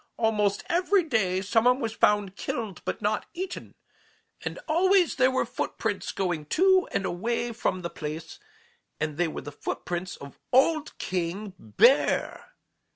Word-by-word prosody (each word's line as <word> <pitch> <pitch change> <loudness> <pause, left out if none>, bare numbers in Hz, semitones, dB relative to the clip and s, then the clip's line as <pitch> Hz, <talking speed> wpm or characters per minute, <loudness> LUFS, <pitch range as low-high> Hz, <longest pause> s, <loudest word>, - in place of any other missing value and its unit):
Almost 210 -3 +1
every 360 +2 +3
day 195 - +1
some 225 +4 +2
one 250 +1 +5
was 225 -4 -2
found 205 -3 +2
killed 220 -5 -4
but - - -3
not 210 +1 0
eaten, 365 +1 -6 0.7
and - - -4
always 360 +2 +3
there 255 0 +5
were 260 -2 +1
footprints 225 -3 -3
going 175 -6 -2
to 375 - +4
and 195 - -1
away 235 +7 -2
from 185 -5 -2
the 170 - -2
place, 160 - -6 0.6
and 155 -1 -2
they 175 0 +2
were 155 - -5
the 145 - -8
footprints 175 +4 -4
of 140 0 -12
_old 310 +4 +3
King 185 +3 -3
Bear! 230 - +2
215 Hz, 150 wpm, -27 LUFS, 180-270 Hz, 0.7 s, one